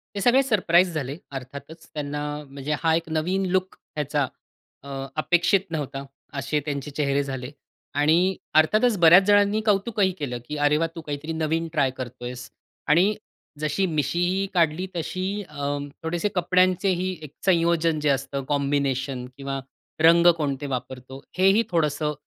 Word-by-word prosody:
ते 200 - -2
सगळे 250 +5 +5
सरप्राईज 185 -7 +3
झाले 140 -2 -3
अर्थातच. 140 +4 -9
त्यांना 145 -1 -4 0.3
म्हणजे 140 +2 -3
हा 165 -1 +3
एक 165 0 -3
नवीन 180 +5 0
लूक 185 0 0 0.2
ह्याचा 145 -2 0 0.6
अ, 140 - -10 0.3
अपेक्षित 170 +4 +3
नव्हता 140 -3 -4 0.4
असे 150 +4 -1
त्यांचे 145 -1 -4
चेहरे 140 -1 0
झाले. 130 -2 -5 0.4
आणि 165 +6 +3 0.2
अर्थातच 215 +9 +4
बऱ्याच 170 +3 +8
जणांनी 205 +1 +4
कौतुकही 205 -1 +2
केलं 130 -5 -3
की, 150 - -4
"अरे 145 +1 +3
वाह! 165 +1 +1
तू 165 - -6
काहीतरी 150 +1 -5
नवीन 160 +1 -1
ट्राय 140 -4 +2
करतोयस." 125 0 -7 0.4
आणि 180 +8 +4 0.4
जशी 155 +6 0
मिशीही 175 +5 0
काढली 170 0 +2
तशी 175 +2 -3 0.3
अं, 145 -1 -3 0.2
थोडेसे 170 +5 -1
कपड्यांचेही 185 +1 +2
एक 150 - -9
संयोजन 170 -3 +2
जे 150 0 +1
असतं 140 0 -1
कॉम्बिनेशन 140 -3 -1
किंवा 135 0 -4 0.4
रंग 170 +1 +6
कोणते 145 -2 -2
वापरतो, 130 +2 -8 0.2
हेही 195 +4 +4
थोडंसं 150 -2 0
155 Hz, 140 wpm, -24 LUFS, 140-180 Hz, 0.6 s, बऱ्याच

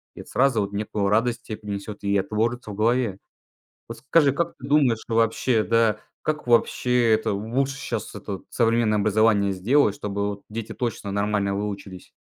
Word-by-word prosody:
и - - -8
это - - -15
сразу 130 -5 +2
вот 100 0 -4
некую 100 -1 -1
радость 115 +3 +1
те 110 - -6
принесет, 105 0 -7
и 100 0 +2
отложится 110 +3 -1
в - - -7
голове. 115 -1 +1 0.7
Вот 115 - -8
скажи, 145 +4 +3
как 170 +5 -2
ты 130 - -9
думаешь, 140 -6 +3
что, 115 - -4
вообще, 115 0 +2
да, 115 -2 +2 0.2
как 150 -3 -3
вообще, 120 0 +3
это 110 -1 +1
лучше 130 +7 -1
щас - - -5
этот 95 -2 -6
современное 115 -2 +2
образование 105 -1 +3
сделать, 105 +5 +2
чтобы 100 0 -2
вот 100 0 -6
дети 115 +1 -6
точно 115 -4 -3
нормально 100 0 0
выучились? 100 -2 -5
110 Hz, 170 wpm, -24 LUFS, 100-120 Hz, 0.7 s, скажи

